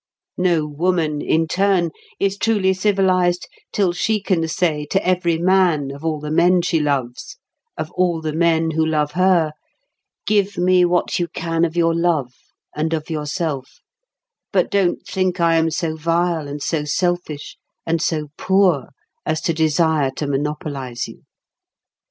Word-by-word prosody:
No 175 -4 +2
woman, 155 0 0
in 160 0 +1
turn, 185 -2 +1 0.3
is 195 0 +1
truly 200 -3 +2
civilised 185 -2 +1 0.2
till 190 -4 +1
she 215 +4 0
can 180 -5 0
say 160 -3 -1
to 195 - 0
every 175 -2 +2
man 175 -5 +2
of 140 +2 -10
all 160 -2 -1
the 150 0 -5
men 175 +2 +4
she 170 -2 +1
loves, 135 -5 -2 0.4
of - - -4
all 180 -2 +1
the 155 -1 -3
men 165 0 +2
who 160 0 +1
love 150 -2 0
her, 180 -2 +3 0.7
"Give 205 -2 +1
me 180 0 +4
what 175 +1 0
you 175 - 0
can 165 0 -2
of 165 0 -4
your 165 -1 +3
love, 165 -7 0 0.4
and 160 +2 -1
of 155 +1 -6
yourself; 150 -3 -3 0.7
but - - +1
don't 195 -4 +1
think 185 -2 -1
I 170 -1 +3
am 160 0 +2
so 160 0 -2
vile, 165 -1 0
and 145 0 -6
so 160 -3 -1
selfish, 165 -1 -2 0.3
and 165 -1 0
so 155 -3 -1
poor 190 -8 +2 0.4
as 155 0 -1
to 165 - 0
desire 160 -2 +2
to 150 - -3
monopolise 140 -3 -3
you. - - -13
165 Hz, 155 wpm, -20 LUFS, 155-180 Hz, 0.7 s, men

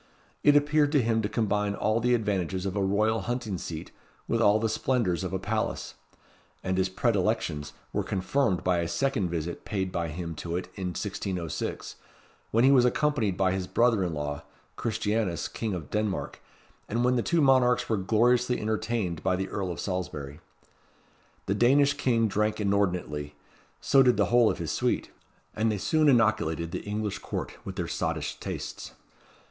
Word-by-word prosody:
It 145 0 +5
appeared 145 0 +3
to 145 - +5
him 115 0 +1
to 105 - -2
combine 105 -2 0
all 110 +2 +1
the 125 +1 +3
advantages 95 -4 -1
of 95 0 -2
a 100 - +1
royal 110 +3 +2
hunting 110 -3 -3
seat 80 -2 -6 0.4
with 115 - +1
all 105 -1 +5
the 115 - +1
splendours 110 -5 0
of 95 - -3
a 95 - 0
palace; 105 +3 -2 0.7
and 95 - -1
his 95 0 +1
predilections 95 -8 0 0.2
were - - 0
confirmed 95 - 0
by 90 -1 +2
a 85 - -1
second 130 -5 0
visit 85 0 -4
paid 95 -3 -2
by 85 -2 -2
him 85 +1 -5
to 85 +1 -4
it 90 - -2
in 95 -2 -4
1606, 90 0 -4 0.5
when 115 +2 +3
he 135 - +6
was 130 -3 +6
accompanied 120 -6 +1
by 95 -1 +2
his 95 -1 -2
brother 115 -3 +3
in 85 -3 -2
law, 75 0 -3 0.3
Christianus, 105 -5 -1
King 110 -4 -3
of 80 -5 -7
Denmark, 105 -2 -2 0.5
and 115 +3 0
when 125 0 +3
the 120 - +2
two 170 +7 +1
monarchs 130 -4 +4
were 110 - +1
gloriously 120 +5 +2
entertained 105 -5 -2
by 95 0 +1
the 95 +1 -3
Earl 95 -2 -3
of 85 - -6
Salisbury. 80 -6 -4 1.1
The 100 - 0
Danish 140 +6 +4
king 120 -5 +1
drank 105 +1 0
inordinately; 90 -8 -1 0.4
so 135 - +4
did 125 -2 +4
the - - +3
whole 120 -2 +6
of - - -1
his - - -3
suite: - - -1 0.4
and 110 +1 +1
they 105 - -1
soon 155 +9 +3
inoculated 95 - +2
the - - -3
English 105 -1 -3
Court - - -4
with - - -7
their - - -2
sottish - - -2
tastes. - - -6
105 Hz, 175 wpm, -28 LUFS, 90-120 Hz, 1.1 s, he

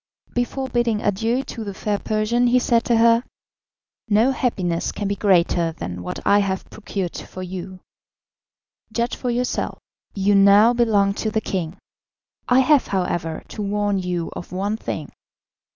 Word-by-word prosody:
Before 255 +2 -2
bidding 240 -4 0
adieu 225 +6 0
to 230 - -7
the 200 -2 -6
fair 205 0 -1
Persian, 225 +3 +1
he 245 +1 +4
said 235 -2 +2
to 235 - +3
her: 230 +1 +5 0.9
"No 220 +5 +4
happiness 185 -10 -1
can 205 - -4
be 200 - -1
greater 175 -4 +2
than 90 - -6
what - - -5
I 205 - +5
have 190 -2 -2
procured 195 -4 -4
for 185 - -7
you; 185 0 -7 1.1
judge 235 +2 -1
for 250 - -3
yourself, 245 +1 -1 0.4
you 200 0 +2
now 200 +4 +6
belong 210 -5 +2
to 220 - 0
the 220 +1 0
king. 185 -4 -4 0.7
I 250 +1 +6
have, 285 +1 +4
however, 175 -4 -2
to 215 - -6
warn 205 0 0
you 180 -2 -3
of - - -8
one 200 +3 -1
thing. 220 - -5
205 Hz, 155 wpm, -22 LUFS, 190-235 Hz, 1.1 s, now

